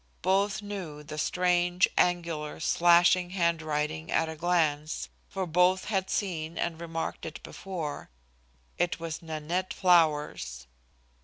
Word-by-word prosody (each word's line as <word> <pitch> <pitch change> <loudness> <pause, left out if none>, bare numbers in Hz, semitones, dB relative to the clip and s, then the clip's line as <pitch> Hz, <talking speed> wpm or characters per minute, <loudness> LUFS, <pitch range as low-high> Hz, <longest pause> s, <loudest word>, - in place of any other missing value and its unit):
Both 200 +3 +1
knew 180 -8 -6
the 150 +1 -7
strange, 180 +3 +2
angular, 170 -4 0
slashing 175 +2 +4
hand 170 -2 +2
writing 150 - -2
at 165 - +2
a 160 - -5
glance, 155 -3 0 0.2
for 190 -1 -3
both 180 +3 +3
had 190 -3 -1
seen 170 -5 -2
and 165 -1 -2
remarked 165 -1 -4
it 160 - -6
before. 170 -6 -6 0.7
It 175 -1 0
was 165 -1 -5
Nanette 165 +3 -3
Flower's. 150 - +2
170 Hz, 125 wpm, -29 LUFS, 155-180 Hz, 0.7 s, slashing